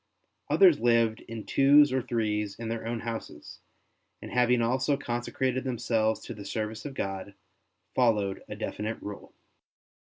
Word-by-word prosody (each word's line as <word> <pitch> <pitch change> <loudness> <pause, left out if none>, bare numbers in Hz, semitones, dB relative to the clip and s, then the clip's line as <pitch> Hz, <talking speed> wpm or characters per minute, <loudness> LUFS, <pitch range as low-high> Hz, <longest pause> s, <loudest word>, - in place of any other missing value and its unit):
Others 180 -6 +6
lived 115 -2 +3
in 115 -1 -7
twos 145 +1 +5
or 130 - +1
threes 105 -4 -1
in 115 -1 -5
their 115 0 -4
own 115 -1 -3
houses, 115 -10 -7 0.6
and - - -9
having 125 0 +3
also 130 +4 +1
conse 120 -3 -4
crated 130 -1 0
themselves 115 -3 0
to - - -7
the 105 - -9
service 110 +1 -4
of 140 -2 -6
God, 95 -1 -4 0.6
followed 105 -6 +1
a - - -5
definite 110 +2 -4
rule. 105 -1 -9
115 Hz, 145 wpm, -28 LUFS, 110-125 Hz, 0.6 s, Others